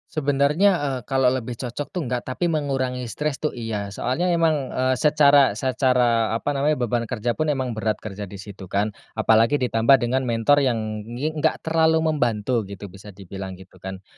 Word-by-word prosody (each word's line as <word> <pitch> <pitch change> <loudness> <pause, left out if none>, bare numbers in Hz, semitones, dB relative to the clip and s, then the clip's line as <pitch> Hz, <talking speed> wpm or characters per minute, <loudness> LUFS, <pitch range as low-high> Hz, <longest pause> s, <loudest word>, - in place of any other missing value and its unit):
Sebenarnya, 150 +5 +2
eee, 135 -3 -2
kalau 135 -2 +3
lebih 125 -2 -3
cocok 125 +4 -5
tuh, 180 - -4
enggak. 125 -2 -3
Tapi 130 +7 -1
mengurangi 130 -5 -2
stress 150 +4 -3
tuh, 150 - -2
iya. 110 -4 -4
Soalnya 160 +9 -1
emang, 165 -5 +1
eee, 130 0 0
secara 145 -5 +5
secara, 125 -2 +1
apa 130 +5 -1
namanya, 145 +2 +1
beban 120 0 -1
kerja 120 0 -1
pun 155 +6 -2
emang 130 -4 -1
berat 110 -1 -1
kerja 100 -1 -7
di 100 - -10
situ, 100 0 -10
kan. 100 +3 0 0.2
Apalagi 115 +3 +3
ditambah 125 -1 +4
dengan 130 +2 0
mentor 115 +5 +3
yang 125 - +1 0.3
ngi 125 +7 -3
enggak 155 -2 -1
terlalu 160 0 +2
membantu 120 -4 0
gitu, 100 0 -9
bisa 100 +1 -13
dibilang 95 0 -8
gitu, 95 0 -16
kan. 95 0 -8
125 Hz, 180 wpm, -23 LUFS, 110-145 Hz, 0.3 s, secara